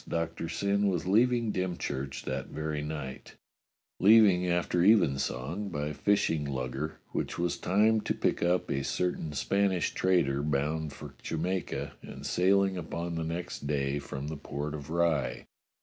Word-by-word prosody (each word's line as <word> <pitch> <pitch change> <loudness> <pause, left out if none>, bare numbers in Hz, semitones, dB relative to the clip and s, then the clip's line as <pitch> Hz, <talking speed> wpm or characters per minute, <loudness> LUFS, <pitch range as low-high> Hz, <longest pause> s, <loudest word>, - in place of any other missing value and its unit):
Doctor 85 0 -2
Syn 100 +4 +1
was 90 -3 0
leaving 115 +3 +3
Dym 90 -1 -1
church 70 0 -4
that 65 0 -3
very 75 -1 -3
night; 75 -3 -6 0.6
leaving 100 -3 +6
after 85 0 +1
evensong 85 - +2
by 75 -3 -3
fish 100 +7 +2
ing 80 -2 -1
lugger 70 +2 -3
which - - -3
was 85 0 0
timed 105 +3 +2
to - - +1
pick - - 0
up 90 +1 +1
a 70 0 0
certain 80 +4 -1
Spanish 95 +4 +1
trader 85 -7 +2
bound 75 +1 -1
for - - -10
Jamaica 90 +3 -2
and - - -9
sailing 95 +1 +3
upon 85 0 -4
the 80 -1 -2
next 85 -2 -4
day 70 -1 0
from 70 0 -6
the 80 0 -4
port 70 +1 -4
of 75 -1 -7
Rye. 80 -7 0
85 Hz, 150 wpm, -30 LUFS, 75-95 Hz, 0.6 s, leaving